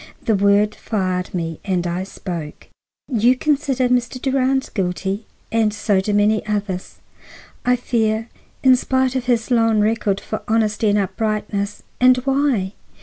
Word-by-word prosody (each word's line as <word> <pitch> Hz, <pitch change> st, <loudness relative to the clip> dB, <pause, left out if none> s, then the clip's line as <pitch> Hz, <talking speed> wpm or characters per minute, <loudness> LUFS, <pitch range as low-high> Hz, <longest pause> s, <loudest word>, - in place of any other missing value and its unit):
The 225 Hz, -, +2 dB
word 200 Hz, +1 st, +3 dB
fired 185 Hz, -5 st, -2 dB
me, 165 Hz, -3 st, -3 dB
and 185 Hz, -3 st, -1 dB
I 175 Hz, +2 st, -2 dB
spoke. 170 Hz, -6 st, -7 dB, 0.4 s
"You 245 Hz, 0 st, +3 dB
consider 275 Hz, -3 st, +1 dB
Mr. 245 Hz, 0 st, 0 dB
Durand 265 Hz, 0 st, 0 dB
guilty, 195 Hz, +2 st, -2 dB, 0.2 s
and 225 Hz, -1 st, +2 dB
so 205 Hz, -2 st, +1 dB
do 210 Hz, -, -2 dB
many 205 Hz, +1 st, +2 dB
others, 205 Hz, -3 st, -3 dB, 0.7 s
I 250 Hz, 0 st, +4 dB
fear, 225 Hz, -2 st, 0 dB, 0.4 s
in 260 Hz, -1 st, +7 dB
spite 260 Hz, +1 st, 0 dB
of 255 Hz, -2 st, -1 dB
his 240 Hz, -1 st, 0 dB
long 225 Hz, -2 st, +3 dB
record 210 Hz, -2 st, +1 dB
for 215 Hz, -, -5 dB
honesty 215 Hz, -1 st, +1 dB
and 205 Hz, -, +3 dB
uprightness. 205 Hz, 0 st, -2 dB, 0.2 s
And 255 Hz, 0 st, +6 dB
why? 270 Hz, -8 st, +1 dB
215 Hz, 145 wpm, -20 LUFS, 200-250 Hz, 0.7 s, in